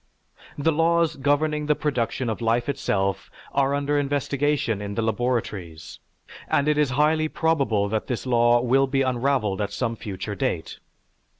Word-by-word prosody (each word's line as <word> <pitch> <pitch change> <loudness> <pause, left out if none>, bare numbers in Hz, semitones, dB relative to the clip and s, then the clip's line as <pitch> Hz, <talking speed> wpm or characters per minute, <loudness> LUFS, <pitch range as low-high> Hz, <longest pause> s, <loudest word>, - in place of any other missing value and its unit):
The 150 +3 +2
laws 165 0 +2
governing 150 +2 0
the 150 - +3
production 130 -4 -1
of 110 +1 -3
life 115 +1 +1
itself 100 -9 -1 0.2
are 140 0 +2
under 145 +1 0
investigation 140 -5 0
in 100 0 -5
the 115 - 0
laboratories 110 -8 -3 0.5
and 140 - +1
it 150 0 +2
is 150 -3 +3
highly 155 +1 +3
probable 140 -12 +1
that 110 0 -2
this 125 0 -3
law 120 -1 +4
will 135 +3 +3
be 135 0 +1
unraveled 125 -5 0
at 100 - -2
some 115 -2 -2
future 100 -1 -6
date. 90 -4 -3
130 Hz, 155 wpm, -24 LUFS, 110-145 Hz, 0.5 s, law